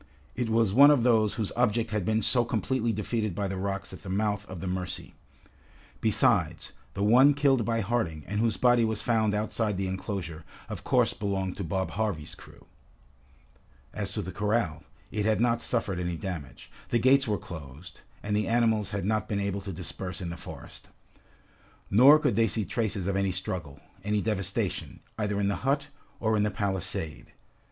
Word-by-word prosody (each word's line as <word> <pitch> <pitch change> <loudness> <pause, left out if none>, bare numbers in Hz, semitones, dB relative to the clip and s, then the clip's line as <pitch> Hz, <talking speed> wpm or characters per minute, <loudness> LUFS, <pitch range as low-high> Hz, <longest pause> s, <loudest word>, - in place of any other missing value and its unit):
It 120 -2 -1
was 110 -3 +2
one 140 +5 +8
of 145 -5 +4
those 110 -4 +3
whose 110 -4 -2
object 115 -2 +1
had 105 -4 -1
been 110 +1 +1
so 120 +3 +3
completely 120 +1 0
defeated 110 -2 -2
by 100 +1 -1
the 95 - -3
rocks 95 +1 -3
at - - -9
the 100 - -9
mouth 105 +1 -1
of 95 -2 -7
the 85 - -6
Mercy. 90 0 -4 0.9
Besides, - - +2 0.2
the 100 - -1
one 130 +7 +6
killed 135 -5 +3
by 115 -1 0
Harding, 100 -9 -1
and 105 +2 -3
whose 115 0 +1
body 120 -1 +4
was 110 -1 -1
found 110 -3 +2
outside 105 -1 -1
the 95 - -1
enclosure, 95 -4 -4 0.3
of - - -6
course - - +2
belonged 95 -2 -2
to 100 - -3
Bob 95 +3 -2
Harvey's 100 -8 -2
crew. - - -15 1.3
As 100 -2 -3
to 105 - -2
the 90 - -5
corral, 105 -3 0 0.3
it 105 -1 -1
had 110 -2 +2
not 115 0 +2
suffered 105 -8 -1
any 90 -1 -2
damage. 80 -6 -7 0.2
The 120 - +2
gates 130 +3 +4
were 105 -1 +1
closed, 80 -1 -10 0.2
and 105 0 -1
the 105 - 0
animals 110 -3 +2
had 100 -2 -3
not 110 +2 0
been 100 -2 0
able 100 0 -2
to 100 0 -6
disperse 90 +1 -5
in 85 -2 -4
the - - -5
forest. - - -10 1.0
Nor 130 +9 +8
could 150 - +1
they 115 +1 +4
see 110 0 0
traces 110 -4 -2
of 100 0 -1
any 100 0 +1
struggle, 90 -6 -4 0.2
any 105 +1 +1
devastation, 100 -3 -2 0.2
either 105 -1 0
in 100 - +1
the 100 - 0
hut, 140 +3 0 0.3
or 110 -1 +1
in 105 - +2
the 105 - +2
palisade. 95 -6 -3
105 Hz, 185 wpm, -28 LUFS, 95-115 Hz, 1.3 s, one